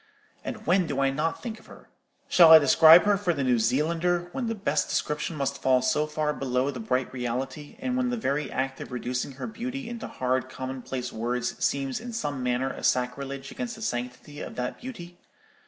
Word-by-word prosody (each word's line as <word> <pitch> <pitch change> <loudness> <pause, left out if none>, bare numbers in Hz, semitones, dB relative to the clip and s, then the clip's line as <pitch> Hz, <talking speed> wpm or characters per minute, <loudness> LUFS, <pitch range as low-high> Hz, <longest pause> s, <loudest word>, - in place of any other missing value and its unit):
—and - - -6
when 180 +1 +3
do 140 -3 -2
I 135 0 +3
not 155 +4 -2
think 225 -2 -5
of - - -20
her? - - -15 0.4
Shall 170 -3 +7
I 160 - +13
describe 160 +3 +8
her 205 -1 +3
for 180 -4 0
the 140 - -1
New 125 -2 +3
Zealander, 170 +8 +1
when 245 +2 -3
the 225 - -2
best 175 -8 0
description 150 +2 -1
must 140 -1 -2
fall 130 -1 +3
so 150 +4 +1
far 150 0 -1
below 130 0 -1
the 130 - -7
bright 125 +3 -1
reality, 130 +4 -4
and 260 -1 -2
when 255 -1 +1
the 245 - -1
very 150 -8 -1
act 135 0 -2
of - - -8
reducing 125 +2 -3
her 135 - -6
beauty 245 +3 -5
into 235 -1 -6
hard 130 0 -1
commonplace 130 -1 -5
words 120 +2 -2
seems 135 +2 0
in 240 +1 -7
some 145 - -3
manner 125 +1 0
a - - -9
sacrilege 135 +2 -1
against 245 -2 -5
the 220 - -9
sanctity 125 - -4
of - - -7
that 125 0 -4
beauty? 175 -9 -9
140 Hz, 205 wpm, -27 LUFS, 130-175 Hz, 0.4 s, I